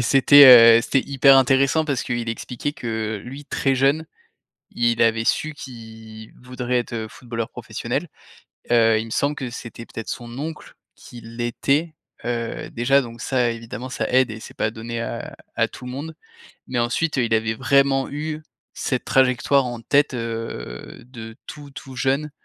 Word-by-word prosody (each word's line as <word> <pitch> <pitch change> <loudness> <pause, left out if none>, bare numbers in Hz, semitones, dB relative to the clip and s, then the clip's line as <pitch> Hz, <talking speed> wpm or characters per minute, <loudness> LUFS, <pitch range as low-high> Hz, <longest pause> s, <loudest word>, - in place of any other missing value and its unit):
Et - - +1
c'était, 125 -2 +8
heu, - - +1
c'était 135 - +1
hyper 135 0 +5
intéressant 135 +4 +3
parce 140 -4 -1
qu'il 120 -2 -3
expliquait 125 +5 -4
que, 110 -3 -4
lui 135 +3 -9
très 135 -1 0
jeune, 140 +4 +2 0.7
il 120 -1 0
avait 115 0 +3
su 155 +5 0
qu'il 110 -4 -11
voudrait 125 0 -2
être, 120 - -8
heu, 110 -1 -3
footballeur 115 -1 -6
professionnel. 120 +7 -4 0.6
Heu, 115 -2 +4
il 110 - -4
me 115 - -11
semble 145 +1 0
que 130 -4 -5
c'était 115 -1 -9
peut-être 115 - -8
son 120 0 -6
oncle 160 +2 -7 0.2
qui 120 -1 -13
l'était, 120 +7 -1 0.3
heu, 120 -1 -3
déjà 135 +4 +3
donc 115 -2 -9
ça 125 -3 +1
évidemment 115 +2 -7
ça 110 -3 -3
aide 130 -2 +3
et 110 - -8
c’est - - -12
pas 110 - 0
donné 115 +1 -6
à 115 - -5 0.2
à - - +2
tout 125 - -12
le 125 - -6
monde. 150 +5 -6 0.5
Mais 130 - -3
ensuite, 125 +7 0
heu, 130 - +2
il 115 - -1
avait 110 0 +1
vraiment 135 +1 +2
eu 155 +1 -5 0.3
cette 130 -2 -2
trajectoire 130 +1 +2
en 120 -2 -5
tête, 145 +4 +2
heu, 115 - -6
de 115 -3 -10
tout, 145 -1 -10
tout 135 -1 -10
jeune 140 +4 0
125 Hz, 175 wpm, -22 LUFS, 115-135 Hz, 0.7 s, c'était